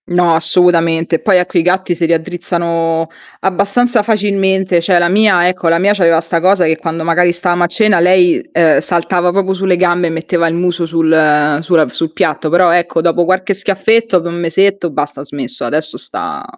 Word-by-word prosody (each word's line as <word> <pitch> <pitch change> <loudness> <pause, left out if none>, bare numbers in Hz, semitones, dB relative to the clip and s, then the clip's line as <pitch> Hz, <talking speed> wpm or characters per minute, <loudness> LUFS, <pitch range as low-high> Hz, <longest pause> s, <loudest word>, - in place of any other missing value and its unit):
No, 175 -1 +1
assolutamente. 165 -1 +1
Poi 195 -3 +2
a 180 - 0
quei 175 -1 -1
gatti 180 +1 0
si 170 0 -2
raddrizzano 165 -1 -2 0.3
abbastanza 205 +5 0
facilmente, 195 -4 0
cioè, 180 +1 +2
la 175 - +1
mia 190 -3 +3
ecco, 180 -1 -2
la 165 - +2
mia 200 +3 +2
c'aveva 170 -5 +2
sta 165 0 -2
cosa, 185 0 +2
che 160 0 0
quando 165 -1 -5
magari 175 +1 +2
stavamo 175 0 -1
a - - +2
cena 200 +1 +1
lei, 180 0 +3
ehm, 165 -2 +3
saltava 175 0 -1
proprio 190 +1 -1
sulle 190 -1 0
gambe 175 -1 +1
e - - -2
metteva 165 +1 -2
il 165 - -2
muso 175 0 -1
sul 155 -3 +1
sulla 165 -3 +1
sul 165 -1 -3
piatto. 160 -3 -1
Però, 175 +1 +3
ecco, 175 -1 0
dopo 170 +1 +1
qualche 185 +2 0
schiaffetto, 200 +2 0
dopo 170 0 -4
un 170 0 -6
mesetto, 190 +2 0
basta, 145 -1 -4
ha - - -8
smesso. 145 - -7
Adesso 155 +1 -3
sta 410 0 -7
175 Hz, 190 wpm, -13 LUFS, 165-190 Hz, 0.3 s, mia